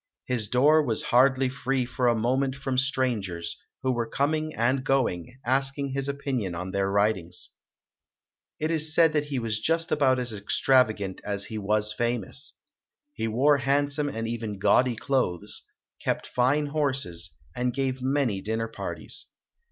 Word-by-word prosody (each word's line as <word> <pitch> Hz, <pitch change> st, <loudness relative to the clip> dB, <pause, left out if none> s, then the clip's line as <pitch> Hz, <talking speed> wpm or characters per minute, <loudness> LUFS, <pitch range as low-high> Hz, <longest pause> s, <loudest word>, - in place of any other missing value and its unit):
His 120 Hz, -4 st, -1 dB
door 145 Hz, +6 st, +5 dB
was 115 Hz, -6 st, +1 dB
hardly 130 Hz, +1 st, +5 dB
free 130 Hz, 0 st, -1 dB
for 125 Hz, 0 st, 0 dB
a 120 Hz, -, +4 dB
moment 130 Hz, +4 st, +1 dB
from 135 Hz, -2 st, -1 dB
strangers, 110 Hz, -11 st, -1 dB, 0.3 s
who 130 Hz, -, +2 dB
were 120 Hz, -2 st, -1 dB
coming 155 Hz, +4 st, 0 dB
and 130 Hz, +3 st, +1 dB
going, 125 Hz, -, 0 dB
ask 135 Hz, +2 st, +1 dB
ing 140 Hz, -1 st, -2 dB
his 135 Hz, +1 st, -2 dB
opinion 130 Hz, -10 st, -2 dB
on 90 Hz, +2 st, -4 dB
their 100 Hz, 0 st, 0 dB
writings. 100 Hz, -4 st, 0 dB, 1.1 s
It 155 Hz, +1 st, 0 dB
is 155 Hz, -1 st, 0 dB
said 165 Hz, -2 st, +5 dB
that 150 Hz, -1 st, +1 dB
he 145 Hz, -2 st, -3 dB
was 115 Hz, -3 st, -1 dB
just 165 Hz, +7 st, 0 dB
about 135 Hz, -3 st, +3 dB
as 125 Hz, -2 st, -2 dB
extravagant 105 Hz, -2 st, +2 dB
as 100 Hz, -1 st, -2 dB
he 110 Hz, -, -5 dB
was 105 Hz, +1 st, 0 dB
famous. 120 Hz, +5 st, -2 dB, 0.6 s
He 115 Hz, -, -2 dB
wore 135 Hz, +6 st, +4 dB
handsome 145 Hz, +1 st, +1 dB
and 115 Hz, -4 st, -3 dB
even 115 Hz, -3 st, -4 dB
gaudy 125 Hz, +5 st, +3 dB
clothes, 110 Hz, -9 st, -1 dB, 0.4 s
kept -, -, -1 dB
fine 135 Hz, +4 st, +2 dB
horses, 130 Hz, -, -2 dB, 0.2 s
and 125 Hz, 0 st, 0 dB
gave 130 Hz, 0 st, -2 dB
many 130 Hz, -7 st, 0 dB
dinner 110 Hz, +2 st, -2 dB
parties. 115 Hz, -, -7 dB
125 Hz, 155 wpm, -27 LUFS, 110-140 Hz, 1.1 s, door